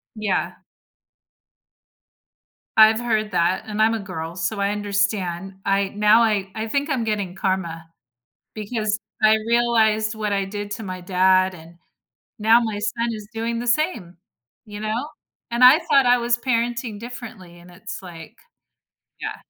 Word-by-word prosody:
Yeah. 215 -3 -2 2.2
I've 220 +1 +7
heard 215 -3 -1
that 180 +2 +1
and 215 0 -1
I'm 225 +1 +3
a - - -1
girl, 170 -4 -6
so 190 +3 -2
I 200 0 +1
understand. 200 -3 -2
I 195 0 +1
now 210 +2 +5
I 205 -4 +1
I 220 0 -4
think 285 +5 -1
I'm 255 -5 -1
getting 205 -4 -2
karma 180 -4 -2 0.7
because 215 0 -2 0.2
I 215 0 +6
realized 220 -2 +2
what 210 -1 -3
I 195 -1 0
did 205 +1 -6
to 220 - -5
my 185 -1 -6
dad, 185 +1 +3
and 165 +1 -14 0.6
now 225 +2 +5
my 220 -3 -3
son 235 +2 -2
is 210 -1 -8
doing 230 +1 -2
the 240 - -5
same, 235 - -1 0.5
you 205 -1 -9
know? 220 +6 -2 0.4
And 240 +1 +1
I 265 +6 +9
thought 280 -6 +3
I 245 0 +5
was 240 0 +1
parenting 235 -3 -2
differently 225 -7 -10
and 175 +1 -16
it's 195 +5 -8
like 175 +3 -11 0.9
Yeah, - - -4
215 Hz, 150 wpm, -22 LUFS, 190-230 Hz, 2.2 s, I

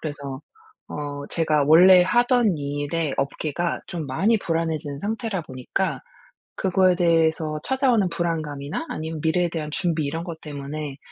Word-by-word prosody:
그래서 140 -3 -6 0.5
어 145 -1 -5
제가 155 -3 +2
원래 180 +4 +8
하던 240 - +3
일의 145 +2 -2
업계가 155 +5 -2
좀 165 -4 -5
많이 200 - +2
불안해진 160 -5 -2
상태라 215 -2 -2
보니까 135 +7 -3 0.6
그거에 185 -1 +3
대해서 160 -3 +2
찾아오는 255 -7 +2
불안감이나 155 - -3
아니면 160 0 -4
미래에 175 +2 +2
대한 160 -2 -4
준비 165 -4 0
이런 160 +4 -3
것 170 -3 -7
때문에 145 -1 -6
160 Hz, 320 characters per minute, -23 LUFS, 145-180 Hz, 0.6 s, 원래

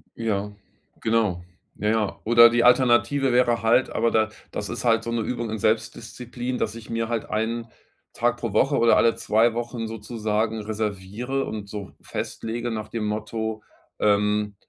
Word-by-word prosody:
Ja, 105 -3 -2 0.5
genau. 110 -6 +1 0.3
Ja 105 - -1
ja. 110 -2 0
Oder 115 +1 +8
die 120 0 +2
Alternative 125 +2 +4
wäre 120 -1 +3
halt 115 +3 +3
aber 115 +1 +1
da 110 0 +2 0.2
das 105 - -4
ist - - -5
halt 115 -1 +3
so 115 - -4
'ne 115 -1 0
Übung 120 0 -3
in 110 - -3
Selbstdisziplin, 120 +3 -2
dass 110 - -2
ich 115 -2 -11
mir 115 0 -1
halt 115 -2 -3
1 115 +2 -2 0.5
Tag - - 0
pro - - -4
Woche - - +3
oder 115 0 +5
alle 115 - +4
2 110 +2 +2
Wochen 120 -1 -4
sozusagen 110 0 -2
reserviere 110 +5 -3
und 105 -2 -6
so 100 -1 -7
festlege 120 +2 -4
nach 110 -1 -5
dem 115 -2 -3
Motto, 110 +1 -3 0.4
ähm, 105 0 +1
110 Hz, 165 wpm, -24 LUFS, 105-120 Hz, 0.5 s, Oder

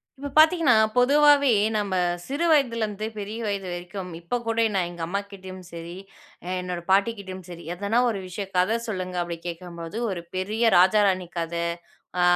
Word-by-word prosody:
இப்ப 285 +1 -6
பார்த்தீங்கன்னா, 315 -5 +6 0.2
பொதுவாவே 285 +1 +5 0.2
நாம 205 -3 0 0.3
சிறுவயதுல 280 -6 +2
இருந்து 210 0 -5
பெரிய 210 +2 -5
வயது 200 -2 -2
வரைக்கும், 180 +1 -6
இப்ப 175 +9 -2
கூட 230 0 +2
நான் 180 -2 +1
எங்க 175 -1 -9
அம்மா 195 +4 -1
கிட்டயும் 185 -1 -9
சரி, 170 +1 -8 0.7
என்னோட 180 -1 -4
பாட்டி 200 +4 +4
கிட்டயும் 190 -2 -8
சரி, 170 -1 -9
“ஏதனா 205 +6 0
ஒரு 210 -4 -2
விஷயம், 195 +2 -6
கதை 195 +6 +3
சொல்லுங்க,” 185 -4 -4
அப்படி 170 -1 -5
கேட்கும்போது 170 +2 -6
ஒரு 175 -3 -4
பெரிய 210 +5 -1
ராஜா, 190 +4 +6
ராணி 185 -2 0
கதை, 170 0 -2 0.6
அ - - +3
195 Hz, 160 wpm, -25 LUFS, 180-230 Hz, 0.7 s, பார்த்தீங்கன்னா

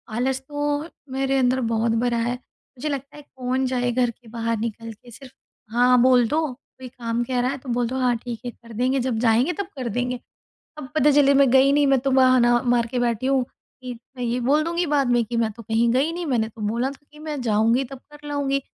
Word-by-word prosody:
आलस 260 +2 0
तो 290 +1 -2 0.3
मेरे 270 0 0
अंदर 255 0 +2
बहुत 225 +1 +1
भरा 240 -1 +1
है। 235 +1 0
मुझे 255 +3 -9
लगता 280 0 -5
है, - - -10
कौन 260 +1 -1
जाए 250 -1 0
घर 245 0 +1
के 235 +1 -23
बाहर 230 0 -2
निकल 230 +1 -5
के, 240 +3 -17
सिर्फ़ 260 +2 -13 0.4
हाँ 245 0 +4
बोल 250 -1 +5
दो, 310 +5 0 0.3
कोई 260 - -8
काम 240 -1 -3
कह 250 0 -2
रहा 250 +1 0
है 280 - -4
तो 260 -1 -11
बोल 240 0 0
दो, 255 - -4
"हाँ 250 -1 +2
ठीक 235 -1 -7
है 245 - -3
कर 235 0 -17
देंगे, 255 +4 +1
जब 245 -2 -1
जाएँगे 240 +8 +2
तब 400 - -1
कर 250 -2 -3
देंगे"। 245 +3 -2 0.6
अब 295 -4 -7
पता 295 -1 +4
चले 280 -1 +5
मैं 275 -2 +5
गई 265 +1 +5
नहीं, 290 0 +3
मैं 270 -2 +4
तो 270 +1 -1
बहाना 255 -2 +4
मार 240 -1 +2
के 245 +1 -2
बैठी 235 0 0
हूँ 270 -2 +2
कि 255 0 -12 0.2
मैं 250 - -4
ये 240 +1 -1
बोल 285 +5 +2
दूँगी 340 +2 -1
बाद 285 -4 +1
में 240 -1 +3
कि, 235 +1 -4
"मैं 225 -1 +1
तो 230 +2 -12
कहीं 225 +2 +1
गई 280 +6 +2
नहीं, 345 +1 -4
मैंने 240 -7 0
तो 220 -1 -13
बोला 235 +4 0
था 285 +1 -16
कि 300 - -16
मैं 305 -2 -5
जाऊँगी 230 +2 +2
तब 265 0 -10
कर 295 0 -12
लाऊँगी। 280 -1 0
250 Hz, 240 wpm, -23 LUFS, 235-275 Hz, 0.6 s, बोल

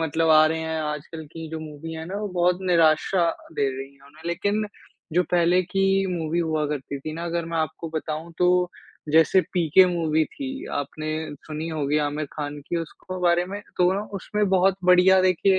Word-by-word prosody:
मतलब 160 0 +1
आ 155 0 +7
रहे 160 +1 0
हैं 160 0 -2
आजकल 150 +1 -5
की 165 -1 -7
जो 160 - -4
मूवी 155 +1 -8
हैं 160 0 -6
ना 190 - -5
वो 210 - -3
बहुत 180 0 +2
निराशा 165 +1 +3 0.2
दे 140 -3 +1
रही 135 +1 -8
है 135 - -27
उन्हें, 155 +3 -17
लेकिन 205 +5 0 0.5
जो 180 - +4
पहले 175 +1 +3
की 195 +1 +1
मूवी 165 0 -2
हुआ 160 -3 0
करती 140 -1 -4
थीं 155 +3 -5
ना 165 +1 -5
अगर 170 0 -2
मैं 165 0 -3
आपको 160 +1 -3
बताऊँ 155 +1 -4
तो 180 0 +3 0.4
जैसे 160 +4 +5
पीके 175 +1 +5
मूवी 160 -3 +1
थी, 270 - -6
आपने 155 +2 -4 0.4
सुनी 155 +1 -4
होगी 150 -1 0
आमिर 150 +1 -3
खान 145 -1 -5
की 170 - -1
उसको 175 +3 -6
बारे 175 0 +3
में 200 +2 -6 0.2
तो 180 +1 +4
ना 195 - -1
उसमें 205 +1 -1
बहुत 190 0 +3
बढ़िया 180 +1 +6
देखिए 185 +1 +3
165 Hz, 195 wpm, -24 LUFS, 155-180 Hz, 0.5 s, आ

